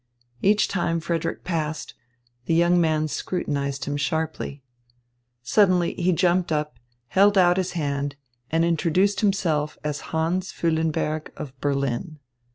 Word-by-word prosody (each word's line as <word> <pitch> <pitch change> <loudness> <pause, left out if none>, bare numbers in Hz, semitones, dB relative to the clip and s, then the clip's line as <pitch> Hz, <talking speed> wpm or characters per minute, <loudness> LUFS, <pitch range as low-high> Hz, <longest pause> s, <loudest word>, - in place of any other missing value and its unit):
Each 210 +2 +4
time 170 -3 0
Frederick 165 0 -2
passed, 160 -3 -3 0.5
the 165 - +1
young 175 +1 +4
man 155 -1 +1
scrutinised 140 -4 -2
him 145 0 -2
sharply. 145 -1 -2 0.8
Suddenly 185 - +3
he 180 +1 +1
jumped 180 0 +2
up, 150 -5 -2 0.3
held 200 +1 +4
out 180 -1 +5
his 185 -1 -1
hand, 140 -3 -2 0.3
and 165 +1 +2
introduced 170 +4 +2
himself 165 -8 +1
as 150 -1 -3
Hans 170 +4 -1
Füllenberg 160 -1 -1
of 145 -4 -7
Berlin. 140 +2 -1
165 Hz, 125 wpm, -24 LUFS, 150-180 Hz, 0.8 s, out